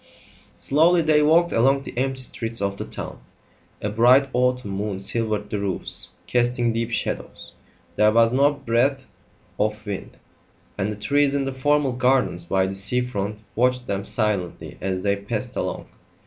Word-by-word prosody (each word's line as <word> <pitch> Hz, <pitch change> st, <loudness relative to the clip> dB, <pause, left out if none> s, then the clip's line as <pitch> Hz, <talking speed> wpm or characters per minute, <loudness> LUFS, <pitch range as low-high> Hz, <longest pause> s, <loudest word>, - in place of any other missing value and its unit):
Slowly 165 Hz, +4 st, +3 dB
they 155 Hz, -1 st, +4 dB
walked 165 Hz, +3 st, +4 dB
along 135 Hz, +4 st, +3 dB
the -, -, -8 dB
empty 130 Hz, +1 st, -1 dB
streets 115 Hz, -2 st, -2 dB
of 100 Hz, 0 st, -2 dB
the -, -, -5 dB
town; -, -, -6 dB, 0.6 s
a 105 Hz, -, 0 dB
bright 125 Hz, +6 st, +4 dB
autumn 125 Hz, -3 st, 0 dB
moon 100 Hz, 0 st, -3 dB
silvered 105 Hz, +1 st, -2 dB
the 105 Hz, -, -1 dB
roofs, 100 Hz, -2 st, +1 dB, 0.2 s
casting 120 Hz, -1 st, +1 dB
deep 115 Hz, +1 st, -2 dB
shadows; 115 Hz, -, -4 dB, 0.4 s
there 105 Hz, 0 st, +5 dB
was 115 Hz, +1 st, +4 dB
no 140 Hz, +3 st, +4 dB
breath 135 Hz, -1 st, 0 dB, 0.5 s
of 105 Hz, +1 st, -1 dB
wind; 100 Hz, -2 st, -6 dB, 0.6 s
and 105 Hz, +1 st, -2 dB
the -, -, -4 dB
trees 140 Hz, +6 st, +1 dB
in 140 Hz, -1 st, 0 dB
the 135 Hz, -, -3 dB
formal 145 Hz, +1 st, +1 dB
gardens 125 Hz, -8 st, +1 dB
by 95 Hz, +2 st, +1 dB
the 95 Hz, -, -3 dB
sea 100 Hz, +6 st, -1 dB
front 105 Hz, -3 st, -4 dB
watched 125 Hz, +1 st, +1 dB
them 100 Hz, -3 st, -2 dB
silently 100 Hz, -5 st, -2 dB
as 95 Hz, -1 st, -2 dB
they 100 Hz, -1 st, +2 dB
passed 100 Hz, 0 st, -5 dB
along. -, -, -3 dB
115 Hz, 160 wpm, -23 LUFS, 105-135 Hz, 0.6 s, there